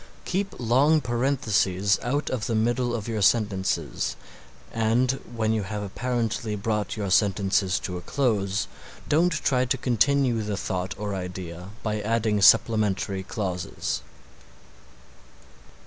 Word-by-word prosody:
Keep 195 Hz, +2 st, -2 dB
long 135 Hz, +7 st, +3 dB
parentheses 115 Hz, -7 st, +1 dB
out 145 Hz, +5 st, -1 dB
of 120 Hz, -3 st, -2 dB
the 115 Hz, -, 0 dB
middle 120 Hz, +2 st, +1 dB
of 110 Hz, -2 st, -5 dB
your 110 Hz, -2 st, -2 dB
sentences 100 Hz, -3 st, +1 dB, 0.6 s
and 115 Hz, +3 st, +2 dB, 0.2 s
when 110 Hz, -1 st, +1 dB
you 110 Hz, -, 0 dB
have 105 Hz, +1 st, -4 dB
apparently 115 Hz, 0 st, -2 dB
brought 105 Hz, +1 st, -2 dB
your 100 Hz, -3 st, -2 dB
sentences 95 Hz, -1 st, +2 dB
to 90 Hz, -1 st, -4 dB
a -, -, -6 dB
close 100 Hz, -4 st, 0 dB, 0.4 s
don't 165 Hz, +4 st, +3 dB
try 135 Hz, -6 st, +1 dB
to 125 Hz, +2 st, 0 dB
continue 125 Hz, 0 st, +2 dB
the 105 Hz, -1 st, -3 dB
thought 95 Hz, -1 st, -3 dB
or 105 Hz, 0 st, -3 dB
idea 90 Hz, -1 st, -6 dB
by 105 Hz, -1 st, -1 dB
adding 110 Hz, -1 st, +1 dB
supplementary 100 Hz, -2 st, +4 dB
clauses. 90 Hz, -, -3 dB
110 Hz, 125 wpm, -25 LUFS, 100-120 Hz, 0.6 s, supplementary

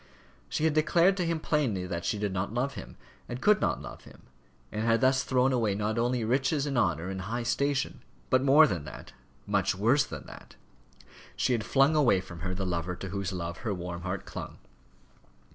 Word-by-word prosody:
She -, -, -2 dB
had 160 Hz, -1 st, +3 dB
declared 170 Hz, +5 st, +4 dB
to 180 Hz, -, 0 dB
him 165 Hz, -1 st, 0 dB
plainly 130 Hz, -, 0 dB
that 85 Hz, -2 st, -4 dB
she 105 Hz, -, 0 dB
did 100 Hz, -2 st, -2 dB
not 95 Hz, +2 st, -2 dB
love 125 Hz, +4 st, -1 dB
him 95 Hz, -, -9 dB, 0.3 s
and 120 Hz, -, -4 dB
could 210 Hz, +7 st, +4 dB
not -, -, 0 dB
love -, -, -10 dB
him, -, -, -16 dB, 0.5 s
and 105 Hz, -, -3 dB
had 115 Hz, 0 st, +3 dB
thus 130 Hz, 0 st, +3 dB
thrown 130 Hz, 0 st, +2 dB
away 110 Hz, -5 st, +1 dB
not 105 Hz, +3 st, -1 dB
only 120 Hz, 0 st, 0 dB
riches 135 Hz, +4 st, +1 dB
and 140 Hz, -2 st, -2 dB
honour 85 Hz, -7 st, +1 dB
and 95 Hz, -1 st, -4 dB
high 115 Hz, +5 st, -3 dB
station, 140 Hz, +4 st, -1 dB, 0.3 s
but 130 Hz, -, +4 dB
more 140 Hz, +4 st, +7 dB
than 85 Hz, -, -2 dB
that -, -, -10 dB, 0.3 s
much 100 Hz, -2 st, +1 dB
worse 120 Hz, +9 st, +3 dB
than -, -, -8 dB
that -, -, -13 dB, 0.8 s
she 125 Hz, -, +1 dB
had 115 Hz, -3 st, 0 dB
flung 140 Hz, +6 st, +3 dB
away 130 Hz, -10 st, +4 dB
from 85 Hz, -2 st, -9 dB
her 90 Hz, +2 st, -3 dB
the 95 Hz, 0 st, -3 dB
lover 90 Hz, 0 st, -2 dB
to 95 Hz, +1 st, -7 dB
whose 100 Hz, 0 st, -3 dB
love 85 Hz, -2 st, -4 dB
her 110 Hz, -4 st, -2 dB
warm 85 Hz, -1 st, -6 dB
heart 90 Hz, +1 st, -4 dB
clung. -, -, -7 dB
115 Hz, 205 wpm, -29 LUFS, 95-135 Hz, 0.8 s, more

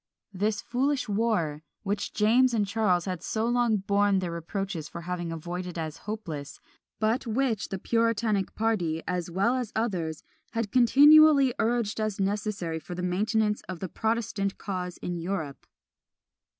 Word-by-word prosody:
this 205 Hz, +2 st, 0 dB
foolish 265 Hz, +2 st, 0 dB
war, 200 Hz, -8 st, 0 dB, 0.2 s
which 205 Hz, 0 st, -2 dB
James 235 Hz, +4 st, +3 dB
and 210 Hz, -2 st, +2 dB
Charles 200 Hz, -4 st, +1 dB
had 185 Hz, -3 st, -3 dB
so 220 Hz, 0 st, -1 dB
long 240 Hz, -2 st, +2 dB
borne 200 Hz, 0 st, +2 dB
their 180 Hz, -2 st, -2 dB
reproaches 170 Hz, -1 st, -4 dB
for 170 Hz, -, -7 dB
having 175 Hz, -1 st, -4 dB
avoided 175 Hz, +2 st, -5 dB
as 155 Hz, -2 st, -4 dB
hopeless, 160 Hz, -10 st, -5 dB, 0.4 s
but 225 Hz, +4 st, 0 dB
which 230 Hz, -2 st, 0 dB
the 195 Hz, -, -3 dB
puritanic 230 Hz, -2 st, 0 dB
party, 180 Hz, -8 st, 0 dB
as 180 Hz, -1 st, -2 dB
well 195 Hz, +8 st, +1 dB
as 250 Hz, -4 st, -2 dB
others, 180 Hz, -9 st, -2 dB, 0.3 s
had 230 Hz, -3 st, -2 dB
continually 280 Hz, +2 st, +7 dB
urged 225 Hz, -2 st, 0 dB
as 215 Hz, -2 st, -2 dB
necessary 195 Hz, -4 st, -1 dB
for 175 Hz, +2 st, -8 dB
the 180 Hz, -, -4 dB
maintenance 210 Hz, +3 st, +1 dB
of 185 Hz, -2 st, -5 dB
the 190 Hz, -, -3 dB
protestant 215 Hz, -1 st, -1 dB
cause 180 Hz, -3 st, -4 dB
in 175 Hz, -1 st, -3 dB
Europe. 165 Hz, -5 st, -4 dB
205 Hz, 150 wpm, -27 LUFS, 180-225 Hz, 0.4 s, continually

